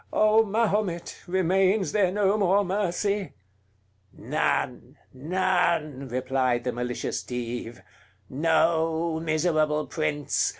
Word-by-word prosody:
O 215 +1 +4
Mahomet! 205 -5 -1
remains 190 +2 +2
there 195 -4 +2
no 200 0 +2
more 200 0 +2
mercy?" 200 +1 -1 0.8
"None! - - -2 0.2
none!" 165 -2 0
replied 130 -1 0
the 125 - -1
malicious 125 0 -3
Dive, 120 -1 -6 0.4
"Know, 160 +2 +1
miserable 155 -1 +1
prince! 150 -3 -1
170 Hz, 90 wpm, -26 LUFS, 145-195 Hz, 0.8 s, O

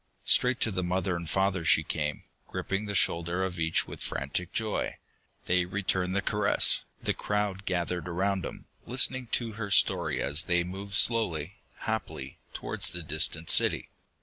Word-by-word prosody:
Straight 125 0 +4
to 115 - +3
the 95 -2 -1
mother 90 0 0
and 85 -2 -5
father 95 -1 +1
she - - +4
came, 75 -1 -2 0.2
gripping 95 +2 -3
the 100 - -3
shoulder 85 +1 +1
of 90 -2 -3
each 80 0 +2
with - - -9
frantic 80 +6 -3
joy. 110 -2 -2 0.5
They 90 0 +2
returned 95 -1 -1
the 100 - +1
caress, 105 0 +2 0.2
the - - +1
crowd 105 -2 -2
gathered 90 -1 -2
around 95 +2 0
them, - - -7 0.2
listening 130 +1 +1
to 115 -2 0
her 105 -1 -5
story - - +2
as 75 +4 +3
they 85 -1 +2
moved 95 +3 -5
slowly, 100 -6 +2 0.3
happily, 80 -11 -4
towards - - 0
the 90 -1 -5
distant 80 +1 +1
city. - - +4
95 Hz, 160 wpm, -29 LUFS, 85-100 Hz, 0.5 s, Straight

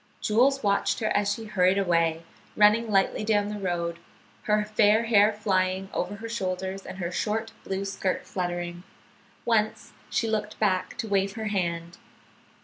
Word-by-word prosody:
Jules 260 +6 +2
watched 200 -1 +1
her 215 - 0
as 205 0 +2
she 225 +2 -4
hurried 185 -2 +2
away, 170 -3 +1 0.3
running 215 +2 +5
lightly 195 +1 +2
down 210 -1 +1
the 210 0 -5
road, 170 -3 -2 0.5
her 210 0 +2
fair 215 +1 +3
hair 215 -2 +5
flying 190 -2 0
over 180 +3 -2
her 225 +2 -7
shoulders 190 -3 -3
and 185 - -7
her 175 -2 -3
short 220 +4 -2
blue 195 +1 -3
skirt 195 -1 -2
fluttering. 175 -1 -4 0.6
Once 220 -2 0 0.2
she 230 - 0
looked 215 -1 -2
back 190 -4 0
to 225 - -3
wave 195 -1 +1
her 220 0 -4
hand. 170 -3 -2
200 Hz, 155 wpm, -26 LUFS, 185-215 Hz, 0.6 s, running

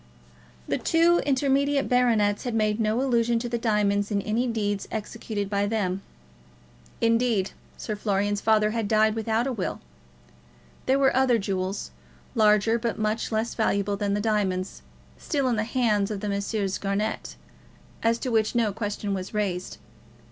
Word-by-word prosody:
The - - -1
two 335 +1 +3
intermediate 275 +1 +2
baronets 225 -5 +2
had 245 -3 -3
made 215 0 +1
no 220 +3 +1
allusion 235 -3 +2
to 235 +1 -3
the 235 0 -2
diamonds 210 -3 +1
in 205 -2 0
any 230 +4 0
deeds 205 -4 -2
executed 215 -1 -4
by 200 0 0
them. 195 -3 -1 1.0
Indeed, 230 -4 +2 0.3
Sir 215 - -4
Florian's 205 0 0
father 215 -1 +3
had 225 -2 -1
died 215 0 +3
without 225 +1 0
a 270 - -1
will. 245 - -3 1.1
There 265 +1 +4
were 270 -2 +3
other 260 -2 +4
jewels, 195 -1 -3 0.4
larger 220 0 +3
but 230 -1 -2
much 215 +2 -1
less 220 +1 -1
valuable 200 -2 0
than 200 0 -1
the 205 - -1
diamonds, 195 -4 -1 0.4
still 280 -4 -1
in 245 - +1
the 215 - 0
hands 225 -5 +1
of 210 -2 -3
the 210 - -2
Messrs. 200 -1 -2
Garnett, 200 +2 -2 0.7
as 230 0 +2
to 255 +1 -3
which 220 0 +1
no 225 -4 +2
question 205 -1 -3
was 190 +2 -5
raised. 185 -4 -2
215 Hz, 155 wpm, -26 LUFS, 205-235 Hz, 1.1 s, There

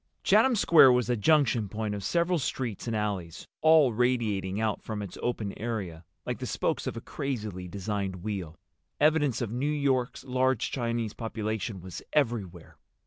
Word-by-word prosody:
Chatham 265 -2 +5
Square 160 - +7
was 125 -1 +1
a - - +2
junction 120 -4 +2
point 110 0 -3
of 100 -1 -5
several 170 - +1
streets 125 -5 -3
and 115 - -1
alleys, 100 -6 -3
all 155 -6 +6
radiating 110 -5 0
out 110 -2 -1
from 110 -2 -5
its 95 - -8
open 110 -5 -2
area 100 -8 -4 0.2
like - - -3
the - - -4
spokes - - -1
of - - -3
a - - -5
crazily 105 -9 -4
designed 100 -1 -4
wheel. 95 -6 -4 0.4
Evidence 145 -5 +3
of 110 - -4
New 130 +5 -1
York's 135 -4 0
large 130 -2 0
Chinese 115 -3 -2
population 110 -3 -4
was 90 0 -8
everywhere. 110 - -1
110 Hz, 160 wpm, -28 LUFS, 100-130 Hz, 0.4 s, Square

